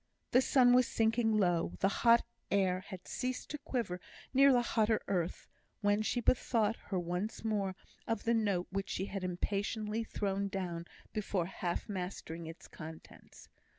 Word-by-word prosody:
The 255 - +6
sun 255 -2 +5
was 250 -1 +5
sinking 225 -1 +2
low, 175 -4 +2
the 195 - +4
hot 235 -1 +6 0.2
air 190 -2 +2
had 185 -3 -9
ceased 255 0 -3
to 300 - -4
quiver 235 - -3 0.3
near 275 +1 +7
the 245 -2 +4
hotter 220 -2 +2
earth, 180 -3 -1 0.3
when 205 0 +3
she 230 +3 0
bethought 230 -2 +2
her 195 - -1
once 180 +6 -3
more 200 -4 0 0.3
of 225 -2 -1
the 230 - +2
note 200 -6 +1
which 195 0 -2
she 190 - -1
had 195 -1 -5
impatiently 210 +4 -1
thrown 200 -2 -1
down 180 -4 -3 0.3
before 200 -4 -1
half 175 -1 -3
mastering 180 -4 -5
its 165 +1 -10
contents. 160 0 -11
205 Hz, 155 wpm, -34 LUFS, 180-230 Hz, 0.3 s, near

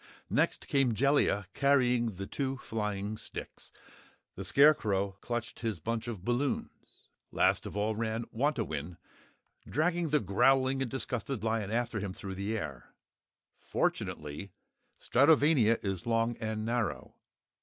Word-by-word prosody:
Next - - +1
came 135 -5 +2
Jellia, 135 -6 +2
carrying 125 -6 +2
the 100 +2 -5
two 135 +4 -3
flying 105 -3 -3
sticks; - - -9 0.6
the 95 - -6
Scarecrow 100 -4 +4
clutched 120 -1 -4
his 110 -6 -2
bunch 115 +6 -3
of 105 -6 -6
balloons. 125 +3 -3 0.2
Last - - +2
of - - -6
all 105 +1 0
ran 115 +1 -2
Wantowin, 110 - -1 0.7
dragging 170 +3 +1
the 150 +1 +3
growling 130 +6 +3
and 130 - -1
disgusted 125 -2 -3
lion 110 -3 0
after 120 0 -1
him 95 -1 -4
through 95 0 -7
the 100 +4 -2
air. 70 - -7 0.6
Fortunately 75 +6 -2 0.5
Stratovania 140 -4 +4
is 95 0 -3
long 115 +1 +1
and 110 -1 -3
narrow. 115 -1 -2
115 Hz, 125 wpm, -31 LUFS, 100-135 Hz, 0.7 s, Scarecrow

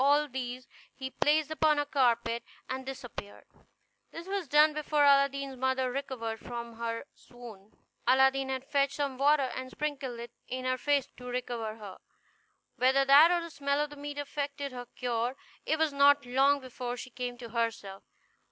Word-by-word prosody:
All 290 +2 +4
these 255 -1 -5 0.3
he 265 -1 -6
placed 305 +2 +2
upon 310 -1 +3
a 290 - +1
carpet, 235 -4 +1 0.2
and 260 0 -5
disappeared; 245 -6 -8 0.6
this 330 +1 -9
was 390 -4 -2
done 300 +2 +5
before 300 -1 +1
Aladdin's 275 -1 +3
mother 260 0 0
recovered 245 -4 -4
from 235 -1 -7
her 230 +1 -3
swoon. 225 -5 -13 0.4
Aladdin 265 +1 +4
had 260 0 -3
fetched 280 -1 +1
some 275 -3 -2
water, 280 -2 +3
and 255 0 -5
sprinkled 270 -4 -4
it 235 0 -8 0.2
in 255 0 -4
her 255 0 0
face 285 -2 +2
to 250 - -10
recover 240 -3 -3
her. 205 -4 -10 0.8
Whether 265 +2 +4
that 285 +4 +8
or 350 -1 +2
the 335 0 -8
smell 280 -1 -1
of 295 0 -1
the - - -9
meat 290 0 -7
effected 285 -1 -4
her 245 -1 -7
cure, 240 0 -2 0.3
it 315 - +2
was 315 -2 +1
not 280 0 +5
long 275 +3 +3
before 250 -1 -5
she 255 - -8
came 245 0 -5
to 235 -1 -9
herself. 225 -4 -3
265 Hz, 170 wpm, -30 LUFS, 245-285 Hz, 0.8 s, that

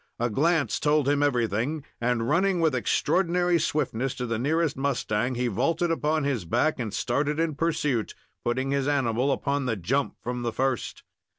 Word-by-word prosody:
A 120 0 -1
glance 160 +5 +1
told 150 -2 +2
him 145 0 +2
everything, 125 +2 0 0.2
and, 120 -1 0
running 185 +3 +2
with 160 -3 +2
extraordinary 175 - +1
swiftness 135 -5 -1
to 125 - -3
the 115 -2 -2
nearest 155 +4 +1
mustang, 130 -3 -1
he 125 +1 -1
vaulted 140 - 0
upon 155 -1 0
his 135 -8 -1
back 125 - +1
and 115 -4 -3
started 145 +8 -1
in 165 -1 +1
pursuit, 150 -6 -1 0.3
putting 130 +3 -1
his 140 -1 0
animal 135 -2 +1
upon 140 0 -1
the 115 - 0
jump 125 +9 -1
from 125 0 -3
the 120 -1 -1
first. 130 +1 -2
135 Hz, 170 wpm, -26 LUFS, 120-155 Hz, 0.3 s, told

